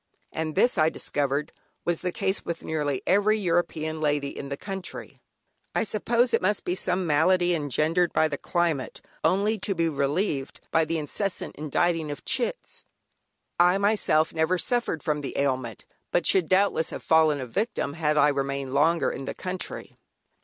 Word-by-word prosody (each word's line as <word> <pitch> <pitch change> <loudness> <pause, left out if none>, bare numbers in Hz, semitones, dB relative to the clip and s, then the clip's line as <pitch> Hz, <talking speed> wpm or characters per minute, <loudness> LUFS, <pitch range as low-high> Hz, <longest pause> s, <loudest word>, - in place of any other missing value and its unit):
And 160 -1 -3
this, 240 -7 +3
I 155 0 +5
discovered 145 0 -1 0.3
was 175 -1 0
the 180 - -1
case 190 +2 -1
with 170 -1 -5
nearly 150 -4 -2
every 205 +3 +3
European 165 -4 -1
lady 145 -2 0
in 140 - -6
the 140 - -4
country. 195 0 -7 0.5
I - - +2
suppose 235 +3 +1
it - - +3
must 195 +2 0
be 175 - 0
some 185 0 -1
malady 175 +3 +3
engendered 160 +3 +1
by 160 - +3
the 145 -2 -5
climate, 170 -6 -1 0.2
only 200 +6 +2
to 195 +1 -2
be 165 -1 +1
relieved 145 0 -1
by 160 0 +3
the 165 +1 -1
incessant 180 +6 -3
inditing 160 +2 0
of 145 - -7
"chits." 260 - -2 0.8
I 180 +2 +5
myself 200 -6 +2
never 160 +3 +1
suffered 240 - 0
from 150 -1 -1
the 140 - -5
ailment, 130 -5 -2 0.3
but - - +1
should 180 -5 +4
doubtless 185 -3 +2
have - - -7
fallen 160 -2 +4
a 130 - -4
victim 200 - -2
had 150 -1 0
I 150 0 +5
remained 140 -1 -2
longer 165 +4 +2
in 135 - -6
the - - -5
country. 185 0 -5
160 Hz, 165 wpm, -26 LUFS, 145-185 Hz, 0.8 s, I